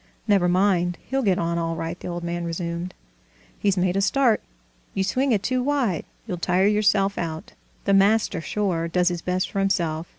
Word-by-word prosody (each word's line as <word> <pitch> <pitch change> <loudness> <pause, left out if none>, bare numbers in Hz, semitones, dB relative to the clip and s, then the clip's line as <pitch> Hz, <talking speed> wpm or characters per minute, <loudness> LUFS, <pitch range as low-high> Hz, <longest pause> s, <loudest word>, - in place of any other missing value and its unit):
"Never 195 -4 +3
mind, 180 -1 +2
he'll 270 0 -1
get 195 -7 +2
on 170 0 -1
all 165 0 -2
right," 165 +2 -4
the - - -7
old 175 -1 -4
man 170 0 -3
resumed. 170 +1 -4 0.6
"He's 200 -2 +1
made 180 0 +1
a 195 - +2
start.... 235 +3 +3 0.5
You 195 - +1
swing 255 +8 +1
it 210 -3 +1
too 255 0 0
wide, 250 - 0 0.2
you'll 180 - -4
tire 180 +2 +2
yourself 200 -1 +2
out.... 160 -2 -5 0.3
The 200 - +3
master, 200 -2 +3
sure, 175 -3 -1
does 180 +1 +2
his 175 -1 -4
best 180 +1 -1
for 195 - -2
himself! 170 -4 0
185 Hz, 190 wpm, -24 LUFS, 170-205 Hz, 0.6 s, Never